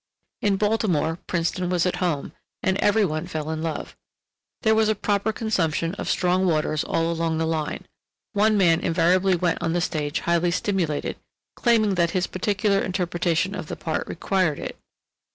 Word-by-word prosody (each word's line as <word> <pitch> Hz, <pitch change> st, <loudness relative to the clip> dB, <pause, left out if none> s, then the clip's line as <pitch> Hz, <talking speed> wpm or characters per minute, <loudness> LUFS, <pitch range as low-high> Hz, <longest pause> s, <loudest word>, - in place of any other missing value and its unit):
In 200 Hz, -2 st, +2 dB
Baltimore, 195 Hz, -6 st, +1 dB
Princeton 175 Hz, +1 st, -1 dB
was 180 Hz, -1 st, +1 dB
at 180 Hz, -, 0 dB
home, 165 Hz, -6 st, -1 dB, 0.3 s
and 190 Hz, -, +2 dB
every 210 Hz, 0 st, +3 dB
one 155 Hz, -3 st, -3 dB
fell 155 Hz, 0 st, -4 dB
in 160 Hz, 0 st, -3 dB
love. 160 Hz, -2 st, -4 dB, 0.7 s
There 220 Hz, -1 st, +4 dB
was 220 Hz, 0 st, +3 dB
a 215 Hz, -, +2 dB
proper 205 Hz, +1 st, 0 dB
consumption 175 Hz, -7 st, -1 dB
of -, -, -5 dB
strong 185 Hz, +1 st, +2 dB
waters 155 Hz, -2 st, +1 dB
all 165 Hz, 0 st, 0 dB
along 165 Hz, -1 st, -1 dB
the 160 Hz, -, 0 dB
line; 160 Hz, -2 st, -2 dB, 0.5 s
one 215 Hz, +1 st, +3 dB
man 170 Hz, -4 st, +4 dB
invariably 180 Hz, +3 st, +3 dB
went 175 Hz, 0 st, 0 dB
on 165 Hz, -1 st, 0 dB
the 175 Hz, -, +1 dB
stage 155 Hz, -3 st, -1 dB
highly 170 Hz, 0 st, +2 dB
stimulated, 175 Hz, -4 st, -1 dB, 0.4 s
claiming 225 Hz, -4 st, +3 dB
that 170 Hz, -, +3 dB
his 180 Hz, -, +1 dB
particular 200 Hz, +1 st, 0 dB
interpretation 180 Hz, -1 st, 0 dB
of 170 Hz, -6 st, -5 dB
the -, -, -5 dB
part 160 Hz, -1 st, -3 dB
required 180 Hz, -4 st, 0 dB
it. -, -, -6 dB
175 Hz, 170 wpm, -24 LUFS, 165-200 Hz, 0.7 s, There